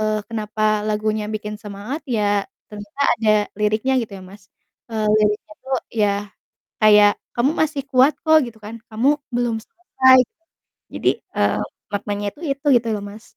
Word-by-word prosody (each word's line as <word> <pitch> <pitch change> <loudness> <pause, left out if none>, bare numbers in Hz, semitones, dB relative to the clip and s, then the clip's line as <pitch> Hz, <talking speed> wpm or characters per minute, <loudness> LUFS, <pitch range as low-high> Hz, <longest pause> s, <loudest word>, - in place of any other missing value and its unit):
eee, 215 0 0
kenapa 215 -1 -1
lagunya 215 0 -1
bikin 210 -1 -5
semangat, 210 +9 -6
ya, 205 -5 +1 0.3
ternyata 205 +5 -10 0.2
ada 220 -1 +2 0.3
liriknya 215 +5 +1
gitu 220 - -8
ya - - -12
Mas, 190 0 -15 0.4
eee, 220 -1 -1
liriknya 210 0 0
tuh, 265 0 -1 0.2
yah 205 -2 +1 0.6
kayak, 210 -1 +7 0.2
"Kamu 240 +4 +2
masih 305 -2 0
kuat 265 +3 +5
kok," 315 -1 +6
gitu 235 -2 -10
kan, 220 +2 -8
"kamu 265 +7 +1 0.2
belum 240 -2 0
selesai." 260 -3 +3 0.7
Jadi, - - +1 0.3
eee, - - +1 0.3
maknanya 205 0 -3
itu - - -18
itu 280 +2 -11
gitu 230 - -6
loh, 205 - -4
Mas. 205 +2 -12
215 Hz, 155 wpm, -21 LUFS, 210-250 Hz, 0.7 s, kayak